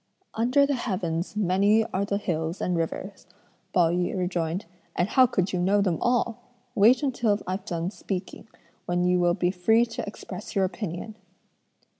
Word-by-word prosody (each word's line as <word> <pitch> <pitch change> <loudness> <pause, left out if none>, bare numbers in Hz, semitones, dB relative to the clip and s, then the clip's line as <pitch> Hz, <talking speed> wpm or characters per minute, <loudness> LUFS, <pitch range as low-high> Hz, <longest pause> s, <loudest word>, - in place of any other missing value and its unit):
"Under 250 +5 +3
the 285 - 0
heavens 185 -8 -2
many 205 +2 +3
are 195 +2 0
the 200 0 -1
hills 165 -3 -2
and 180 - 0
rivers," 185 +4 -4 0.4
Pao 175 -3 +3
yü 180 +2 -1
rejoined, 180 0 -2 0.3
"and 175 - +1
how 260 -2 +5
could 190 -6 -1
you 180 - 0
know 195 +3 +3
them 185 -5 +1
all? 240 -1 +1 0.3
Wait 240 +5 +5
until 240 -6 +1
I've 185 +2 -4
done 170 -2 -3
speaking, 195 -1 -6 0.4
when 175 0 +1
you 180 0 +3
will 175 0 +3
be 180 -1 +1
free 220 +6 +3
to 230 - -6
express - - -8
your 195 -1 +3
opinion!" 190 +2 -5
190 Hz, 165 wpm, -26 LUFS, 175-220 Hz, 0.4 s, how